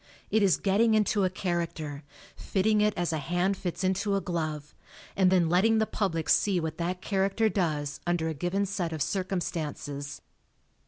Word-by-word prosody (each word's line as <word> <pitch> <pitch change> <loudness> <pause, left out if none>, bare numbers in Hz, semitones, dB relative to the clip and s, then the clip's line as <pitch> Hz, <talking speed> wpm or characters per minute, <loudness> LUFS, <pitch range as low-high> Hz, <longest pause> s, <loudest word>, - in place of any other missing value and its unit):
It 220 - +3
is 195 -3 +4
getting 220 +3 +3
into 210 -2 +2
a - - +2
character, 170 -5 -3 0.3
fitting 210 +2 +1
it 210 0 +2
as 175 -2 0
a 160 - -1
hand 175 +6 0
fits 180 -1 -4
into 195 +2 +1
a - - +2
glove, 155 -5 -4 0.4
and 185 -1 +4
then 180 -3 +4
letting 195 +7 +3
the 220 - +3
public 170 -8 -2
see 195 -3 +3
what 160 -1 -4
that 180 +2 -2
charac 195 -1 0
ter 225 -1 +3
does 150 -7 -1
under 175 -2 +1
a 160 - -1
given 175 +7 -1
set 185 -4 -3
of 155 - 0
circumstances. 155 - -3
180 Hz, 175 wpm, -28 LUFS, 160-200 Hz, 0.4 s, is